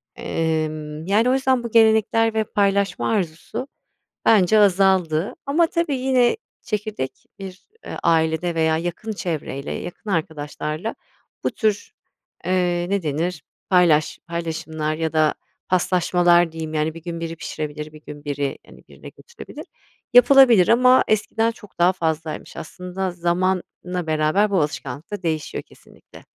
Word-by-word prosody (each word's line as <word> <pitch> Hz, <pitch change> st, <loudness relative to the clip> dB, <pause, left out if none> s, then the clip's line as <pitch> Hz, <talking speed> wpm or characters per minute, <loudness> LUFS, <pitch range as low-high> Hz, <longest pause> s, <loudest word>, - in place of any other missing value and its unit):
Emm, 155 Hz, -1 st, -3 dB
yani, 210 Hz, +6 st, +3 dB
o -, -, +3 dB
yüzden 260 Hz, -2 st, +1 dB
bu 235 Hz, -, -5 dB
gelenekler 225 Hz, 0 st, +4 dB
ve 220 Hz, 0 st, +1 dB
paylaşma 200 Hz, -1 st, 0 dB
arzusu 205 Hz, -, -3 dB, 0.6 s
bence 215 Hz, -1 st, +5 dB
azaldı. 190 Hz, -4 st, +3 dB
Ama 320 Hz, +5 st, +3 dB
tabii 330 Hz, -4 st, -1 dB
yine 255 Hz, -, +2 dB, 0.3 s
çekirdek 210 Hz, -, -4 dB
bir, 195 Hz, -1 st, -10 dB, 0.2 s
ııı, -, -, -6 dB
ailede 165 Hz, +1 st, +1 dB
veya 160 Hz, -1 st, +2 dB
yakın 175 Hz, +6 st, -4 dB
çevreyle, 155 Hz, -7 st, -4 dB
yakın 180 Hz, +4 st, -7 dB
arkadaşlarla 155 Hz, +3 st, -3 dB, 0.5 s
bu -, -, +1 dB
tür, 215 Hz, -2 st, -1 dB, 0.5 s
eee, 175 Hz, -1 st, 0 dB
ne 200 Hz, -1 st, 0 dB
denir, 160 Hz, +1 st, -2 dB, 0.3 s
paylaş 170 Hz, -5 st, +3 dB
paylaşımlar 160 Hz, -2 st, -3 dB
ya 160 Hz, 0 st, -2 dB
da 155 Hz, -1 st, +2 dB, 0.3 s
paslaşmalar 175 Hz, -1 st, +3 dB
diyeyim, 160 Hz, -1 st, -6 dB
yani, 155 Hz, +1 st, 0 dB
bir 165 Hz, -, -10 dB
gün 170 Hz, 0 st, -5 dB
biri 165 Hz, 0 st, -5 dB
pişirebilir 150 Hz, -1 st, -6 dB
bir 155 Hz, 0 st, -14 dB
gün 145 Hz, 0 st, -11 dB
biri, 140 Hz, -1 st, -3 dB
hani, -, -, -17 dB
birine -, -, -12 dB
götürebilir, 475 Hz, 0 st, -12 dB, 0.5 s
yapılabilir. 245 Hz, -6 st, +7 dB
Ama 250 Hz, +2 st, +5 dB
eskiden 225 Hz, +1 st, +1 dB
çok 210 Hz, -4 st, -15 dB
daha 175 Hz, +2 st, +4 dB
fazlaymış 160 Hz, -3 st, -4 dB
aslında 180 Hz, +3 st, -5 dB
zamanla 180 Hz, 0 st, -2 dB
beraber 155 Hz, +7 st, +2 dB
bu 190 Hz, -4 st, +2 dB
alışkanlık 145 Hz, 0 st, -4 dB
da 205 Hz, -2 st, -5 dB
değişiyor 160 Hz, -3 st, -3 dB
kesinlikle. -, -, -18 dB
175 Hz, 135 wpm, -22 LUFS, 160-210 Hz, 0.6 s, yapılabilir